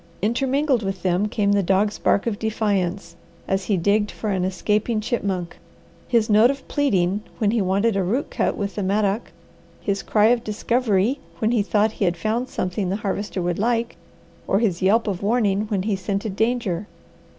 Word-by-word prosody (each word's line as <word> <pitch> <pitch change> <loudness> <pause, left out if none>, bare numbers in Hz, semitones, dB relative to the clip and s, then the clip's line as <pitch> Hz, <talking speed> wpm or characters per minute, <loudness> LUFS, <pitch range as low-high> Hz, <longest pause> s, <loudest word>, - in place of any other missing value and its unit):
Intermingled 265 +3 +1
with 195 -2 -4
them 185 +2 +1
came 210 -2 0
the 205 0 +3
dog's 195 +3 +1
bark 200 - +2
of 220 -3 -2
defiance 200 -5 -1 0.3
as 195 0 0
he 205 - +1
digged 205 +4 +2
for 215 - -4
an 185 -2 0
escaping 210 +4 0
chipmunk, 195 -6 -3 0.5
his 230 -3 +2
note 215 +3 +5
of 275 0 -4
pleading 205 - +1 0.2
when 210 -2 +1
he 230 -1 +1
wanted 200 +4 +1
a 195 - +1
root 225 +10 -1
cut - - 0
with 200 -1 -3
the 210 - -3
mattock, 200 +3 0 0.5
his 200 -1 -2
cry 215 0 +3
of 240 -1 +2
discovery 230 +2 0 0.2
when 220 +1 +1
he 235 -3 +2
thought 210 +1 +2
he 210 - -1
had 175 -1 0
found 225 +8 -1
something 185 +1 -2
the 190 - 0
Harvester 200 -2 -3
would 175 0 -1
like, 230 +1 0 0.5
or 195 - +2
his 195 -5 0
yelp 210 +5 +3
of 195 -4 -3
warning 210 -1 +1
when 200 -4 0
he 210 -1 0
scented 195 +1 -3
danger. 220 -5 0
205 Hz, 185 wpm, -22 LUFS, 195-225 Hz, 0.5 s, note